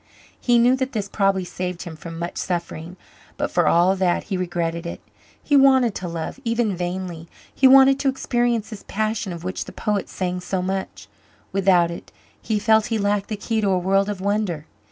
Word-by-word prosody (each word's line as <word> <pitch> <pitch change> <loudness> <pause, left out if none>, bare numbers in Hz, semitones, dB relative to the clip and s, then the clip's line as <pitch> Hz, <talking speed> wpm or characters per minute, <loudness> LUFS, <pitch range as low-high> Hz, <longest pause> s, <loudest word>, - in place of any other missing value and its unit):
He 240 -1 +3
knew 245 +2 +5
that 260 0 -2
this 210 -3 -2
probably 195 -2 +1
saved 180 0 -5
him 170 -3 -8
from 165 +1 -9
much 170 +1 -5
suffering, 175 -1 -4 0.4
but - - -2
for - - +2
all 180 +3 +4
that 185 -2 +1
he 200 - -3
regretted 170 -2 -2
it. - - -6 0.4
He 290 - +2
wanted 265 -4 +5
to 180 - -5
love, 165 +8 -5
even 230 -3 0
vainly; 175 -2 -4 0.3
he 265 - +5
wanted 270 +1 +7
to 275 - +2
experience 240 -4 0
this 215 - -8
passion 215 -2 -2
of 170 -1 -7
which 185 +1 -4
the - - -9
poets 210 -3 -2
sang 180 -1 -2
so 180 0 -3
much. 190 +1 -4 0.4
Without 185 -3 +3
it 170 - -9 0.3
he 220 - -1
felt 220 +1 +3
he 225 - -1
lacked 205 -1 0
the 215 - -3
key 220 +1 -1
to 205 - +1
a 190 - +2
world 195 +3 +1
of 205 -2 -4
wonder. 200 -6 -1
195 Hz, 195 wpm, -22 LUFS, 180-220 Hz, 0.4 s, wanted